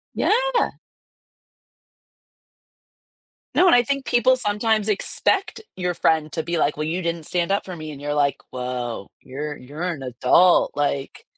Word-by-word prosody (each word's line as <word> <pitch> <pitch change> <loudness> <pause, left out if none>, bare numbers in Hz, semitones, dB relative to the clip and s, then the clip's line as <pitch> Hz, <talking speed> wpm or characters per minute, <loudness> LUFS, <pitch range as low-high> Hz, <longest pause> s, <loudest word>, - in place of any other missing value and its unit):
Yeah! - - +1 2.8
No, 370 - +5
and 350 - +7
I 245 - +5
think 275 +1 -2
people 250 +2 +3
sometimes 215 -1 0
expect 375 - 0 0.2
your 180 -1 -2
friend 160 -2 +1
to 160 - -2
be 170 +1 -2
like, 150 -1 +1
"Well, 155 - -2
you 170 +4 -2
didn't 170 -2 -3
stand 175 +2 -1
up 200 - 0
for 185 - -7
me," 155 -2 -7
and 140 - -10
you're 145 0 -2
like, 145 -1 +1
"Whoa, 125 -4 -4
you're 145 +3 -6
you're 145 +5 -10
an 170 -7 -3
adult," 135 +8 +4
like 140 -1 -2
170 Hz, 155 wpm, -22 LUFS, 145-210 Hz, 2.8 s, and